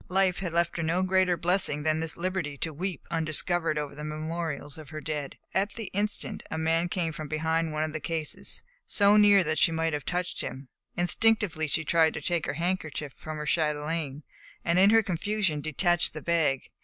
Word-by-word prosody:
Life 185 Hz, -1 st, +2 dB
had 180 Hz, -2 st, -3 dB
left 170 Hz, +1 st, +1 dB
her -, -, -1 dB
no 170 Hz, +3 st, +1 dB
greater 185 Hz, -1 st, +3 dB
blessing 170 Hz, -3 st, 0 dB
than 155 Hz, 0 st, +2 dB
this 160 Hz, -1 st, -3 dB
liberty 175 Hz, -5 st, -2 dB
to 160 Hz, +3 st, -2 dB
weep 180 Hz, +4 st, -4 dB
undiscovered 165 Hz, 0 st, 0 dB
over 150 Hz, -2 st, -3 dB
the 150 Hz, +1 st, -8 dB
memorials 155 Hz, -1 st, -4 dB
of 155 Hz, -3 st, -11 dB
her 155 Hz, 0 st, -6 dB
dead. 150 Hz, -3 st, -4 dB, 0.2 s
At 200 Hz, +1 st, +1 dB
the 225 Hz, -4 st, -6 dB
instant 205 Hz, +2 st, -1 dB
a 160 Hz, -, -3 dB
man 165 Hz, +2 st, +1 dB
came 170 Hz, -3 st, -1 dB
from 155 Hz, 0 st, -6 dB
behind 160 Hz, +2 st, 0 dB
one 155 Hz, 0 st, -1 dB
of 155 Hz, -1 st, -3 dB
the 155 Hz, -, -2 dB
cases, 160 Hz, -1 st, -2 dB, 0.2 s
so 205 Hz, 0 st, +5 dB
near 205 Hz, -2 st, +7 dB
that 155 Hz, -2 st, 0 dB
she -, -, +5 dB
might 160 Hz, 0 st, 0 dB
have 145 Hz, -1 st, -2 dB
touched 180 Hz, 0 st, -2 dB
him. 135 Hz, 0 st, -6 dB, 0.3 s
Instinctively 180 Hz, -3 st, +2 dB
she 160 Hz, +2 st, -1 dB
tried 160 Hz, 0 st, +3 dB
to -, -, -4 dB
take 170 Hz, -3 st, -1 dB
her 140 Hz, -, -1 dB
handkerchief 160 Hz, -4 st, -2 dB
from 155 Hz, 0 st, -7 dB
her 150 Hz, -, -4 dB
chatelaine, 150 Hz, -2 st, -1 dB, 0.4 s
and 170 Hz, +2 st, +3 dB
in 195 Hz, +2 st, +7 dB
her 225 Hz, +1 st, +5 dB
confusion 190 Hz, -3 st, -1 dB
detached 175 Hz, +4 st, +1 dB
the 155 Hz, -, -5 dB
bag. 160 Hz, -6 st, +1 dB
165 Hz, 200 wpm, -28 LUFS, 155-180 Hz, 0.4 s, near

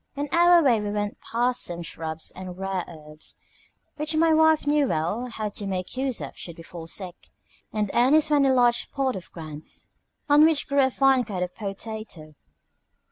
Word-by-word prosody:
On 290 Hz, +1 st, -2 dB
our 345 Hz, 0 st, +6 dB
way 240 Hz, -6 st, +3 dB
we 205 Hz, -, -3 dB
went 205 Hz, 0 st, -3 dB
past 245 Hz, +2 st, 0 dB
some 175 Hz, 0 st, -2 dB
shrubs 160 Hz, -1 st, -5 dB
and 185 Hz, -1 st, -8 dB
rare 190 Hz, -1 st, -2 dB
herbs, 155 Hz, -2 st, -8 dB, 0.6 s
which 310 Hz, +1 st, -2 dB
my 325 Hz, 0 st, +4 dB
wife 315 Hz, -1 st, +4 dB
knew 290 Hz, -1 st, +3 dB
well 190 Hz, +10 st, -1 dB
how 220 Hz, -3 st, -4 dB
to 205 Hz, 0 st, -6 dB
make 185 Hz, +1 st, -4 dB
use 260 Hz, -2 st, -1 dB
of -, -, -7 dB
should 170 Hz, -2 st, -9 dB
we 165 Hz, -, -10 dB
fall 165 Hz, -1 st, -9 dB
sick; 180 Hz, 0 st, -8 dB, 0.4 s
and 210 Hz, -2 st, -1 dB
Ernest 285 Hz, +6 st, +4 dB
found 290 Hz, -2 st, +4 dB
a -, -, +4 dB
large 245 Hz, -2 st, +4 dB
spot 270 Hz, -3 st, -2 dB
of 185 Hz, -2 st, -9 dB
ground 155 Hz, -3 st, -8 dB, 0.7 s
on 295 Hz, +1 st, +6 dB
which 315 Hz, -2 st, +3 dB
grew 280 Hz, 0 st, +3 dB
a 265 Hz, -, +4 dB
fine 265 Hz, -1 st, +3 dB
kind 190 Hz, -6 st, -3 dB
of 180 Hz, 0 st, -5 dB
PO 200 Hz, -3 st, -5 dB
TA 220 Hz, +1 st, -6 dB
TO. 155 Hz, -6 st, -11 dB
220 Hz, 195 wpm, -25 LUFS, 180-275 Hz, 0.7 s, our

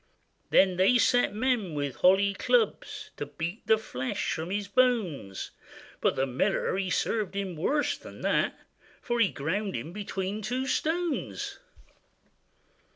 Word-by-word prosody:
Then 185 Hz, -2 st, +4 dB
they 195 Hz, +7 st, +5 dB
set 245 Hz, -1 st, +3 dB
men 220 Hz, -6 st, 0 dB
with 140 Hz, -4 st, -2 dB
holly 195 Hz, +6 st, +4 dB
clubs, 455 Hz, -, 0 dB
To -, -, -4 dB
beat 170 Hz, +6 st, -5 dB
the 220 Hz, -, +6 dB
flesh 130 Hz, -, -3 dB
from 160 Hz, +1 st, -4 dB
his 200 Hz, +1 st, -2 dB
bones; 200 Hz, -, 0 dB, 0.5 s
But -, -, +2 dB
the 135 Hz, -, +1 dB
miller 135 Hz, +12 st, 0 dB
he 190 Hz, -1 st, -1 dB
served 205 Hz, +2 st, 0 dB
him 195 Hz, -3 st, -3 dB
worse 285 Hz, -, +1 dB
than -, -, -11 dB
that, -, -, +1 dB, 0.4 s
For 240 Hz, 0 st, -2 dB
he 215 Hz, -5 st, +5 dB
ground 190 Hz, +8 st, -2 dB
him 155 Hz, +9 st, -5 dB
betwixt 205 Hz, +1 st, -3 dB
two 255 Hz, +2 st, -1 dB
stones. 325 Hz, +3 st, -1 dB
200 Hz, 140 wpm, -28 LUFS, 170-240 Hz, 0.5 s, the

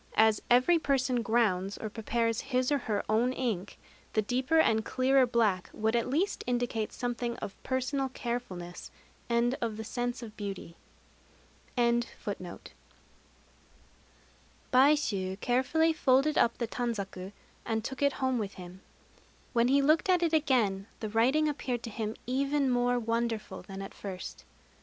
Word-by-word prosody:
As 220 Hz, -1 st, +5 dB
every 255 Hz, +8 st, +5 dB
person 265 Hz, -4 st, +1 dB
grounds 210 Hz, -5 st, +1 dB
or 220 Hz, -, -4 dB
prepares 230 Hz, +1 st, -1 dB
his 255 Hz, 0 st, 0 dB
or 285 Hz, -, +3 dB
her 210 Hz, -, +1 dB
own 230 Hz, +4 st, +2 dB
ink, 215 Hz, -8 st, -3 dB, 0.4 s
the 215 Hz, -, +2 dB
deeper 255 Hz, +8 st, +1 dB
and 220 Hz, -8 st, +4 dB
clearer 260 Hz, +2 st, +3 dB
black 215 Hz, -6 st, +1 dB
would 220 Hz, +2 st, 0 dB
at 235 Hz, +1 st, 0 dB
least 335 Hz, +10 st, 0 dB
indicate 240 Hz, -3 st, -1 dB
something 240 Hz, -1 st, -3 dB
of 195 Hz, -, -6 dB
personal 265 Hz, +1 st, -1 dB
carefulness 235 Hz, -9 st, -5 dB, 0.4 s
and 235 Hz, +1 st, +2 dB
of 225 Hz, -3 st, -2 dB
the 220 Hz, -, -4 dB
sense 245 Hz, +2 st, -3 dB
of 220 Hz, -2 st, -9 dB
beauty. 195 Hz, -4 st, -6 dB, 1.0 s
Baishû 235 Hz, -6 st, -1 dB, 2.9 s
carefully 290 Hz, +8 st, +2 dB
folded 280 Hz, 0 st, +3 dB
up 235 Hz, -, +3 dB
the 235 Hz, -, -2 dB
tanzaku, 200 Hz, -6 st, -4 dB, 0.3 s
and 220 Hz, -1 st, -1 dB
took 265 Hz, +4 st, -5 dB
it 280 Hz, -1 st, +3 dB
home 260 Hz, -2 st, 0 dB
with 200 Hz, -2 st, -4 dB
him. 180 Hz, +1 st, -10 dB, 0.7 s
When 235 Hz, -1 st, +3 dB
he 275 Hz, +2 st, +4 dB
looked 310 Hz, +5 st, +3 dB
at 360 Hz, -1 st, +4 dB
it 330 Hz, -1 st, +1 dB
again 230 Hz, -10 st, +2 dB
the 215 Hz, -, -4 dB
writing 260 Hz, +8 st, +3 dB
appeared 255 Hz, -5 st, -2 dB
to 230 Hz, -, -6 dB
him 215 Hz, 0 st, -3 dB
even 275 Hz, +2 st, +1 dB
more 245 Hz, 0 st, +2 dB
wonderful 230 Hz, -1 st, -2 dB
than 195 Hz, -1 st, -8 dB
at 195 Hz, -, -8 dB
first. 190 Hz, -3 st, -7 dB
240 Hz, 145 wpm, -30 LUFS, 215-260 Hz, 2.9 s, As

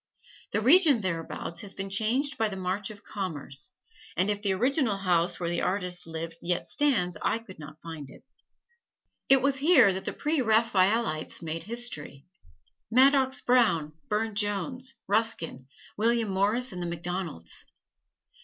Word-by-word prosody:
The 210 Hz, -, 0 dB
region 285 Hz, -, +6 dB
thereabouts 170 Hz, -2 st, -4 dB
has 195 Hz, -1 st, -7 dB
been 195 Hz, 0 st, -5 dB
changed 245 Hz, +8 st, +1 dB
by 220 Hz, -1 st, 0 dB
the 195 Hz, -, -6 dB
march 190 Hz, +1 st, -2 dB
of 210 Hz, -1 st, -11 dB
commerce, 150 Hz, -8 st, -5 dB, 0.5 s
and 185 Hz, +4 st, +2 dB
if 205 Hz, 0 st, -3 dB
the 200 Hz, -2 st, 0 dB
original 245 Hz, +1 st, +1 dB
house 175 Hz, -2 st, +1 dB
where 175 Hz, -, -2 dB
the 175 Hz, 0 st, -1 dB
artist 180 Hz, -2 st, -2 dB
lived 165 Hz, 0 st, -6 dB
yet 175 Hz, 0 st, -1 dB
stands 205 Hz, -, +1 dB
I -, -, +1 dB
could 210 Hz, -7 st, -13 dB
not 155 Hz, +1 st, -11 dB
find 160 Hz, -5 st, -8 dB
it. -, -, -15 dB, 1.1 s
It 270 Hz, -1 st, +6 dB
was 275 Hz, -1 st, +2 dB
here 270 Hz, -, +5 dB
that 190 Hz, -, -6 dB
the -, -, -3 dB
Preraphaelites 225 Hz, -, +1 dB
made 165 Hz, 0 st, -4 dB
history: 210 Hz, -, -3 dB, 0.7 s
Madox 265 Hz, +1 st, +4 dB
Brown, 220 Hz, -12 st, +3 dB, 0.2 s
Burne 215 Hz, +1 st, -1 dB
Jones, 220 Hz, +6 st, -2 dB
Ruskin, 200 Hz, -, 0 dB, 0.3 s
William 230 Hz, 0 st, +1 dB
Morris 210 Hz, +7 st, +1 dB
and 180 Hz, -1 st, -6 dB
the 175 Hz, -, -3 dB
MacDonalds. 170 Hz, -, -1 dB
200 Hz, 145 wpm, -28 LUFS, 175-235 Hz, 1.1 s, region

